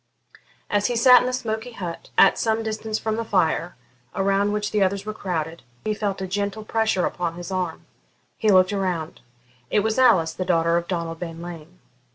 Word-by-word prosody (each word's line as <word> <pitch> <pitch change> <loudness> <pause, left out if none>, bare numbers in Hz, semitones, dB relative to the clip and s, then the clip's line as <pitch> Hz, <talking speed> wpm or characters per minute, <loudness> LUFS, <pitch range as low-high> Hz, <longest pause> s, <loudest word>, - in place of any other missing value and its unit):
As 205 0 +1
he 245 - -2
sat 250 +1 +7
in - - -1
the - - 0
smoky 235 -1 -3
hut, 175 -6 -7
at - - +6
some 225 0 0
distance 220 0 -3
from 220 0 -2
the 230 - -1
fire, 180 -4 0 0.4
around 195 +1 +1
which 210 0 -2
the 210 - +1
others 195 +1 +1
were 215 - -4
crowded, 165 -5 -4 0.2
he 215 - +1
felt 200 -2 -3
a - - -3
gentle 205 +3 -3
pressure 220 -5 +1
upon 170 -2 -3
his 175 +1 -7
arm. 180 -3 -3 0.5
He 215 -2 +3
looked 185 0 +5
round; 180 -5 -2 0.5
it 210 - +2
was 220 +4 0
Alice, 185 -11 +4
the 185 - -3
daughter 170 -2 +2
of 170 0 -1
Donald 165 -2 -3
Bean 165 -1 -6
Lean. 175 0 -9
195 Hz, 195 wpm, -23 LUFS, 175-220 Hz, 0.5 s, sat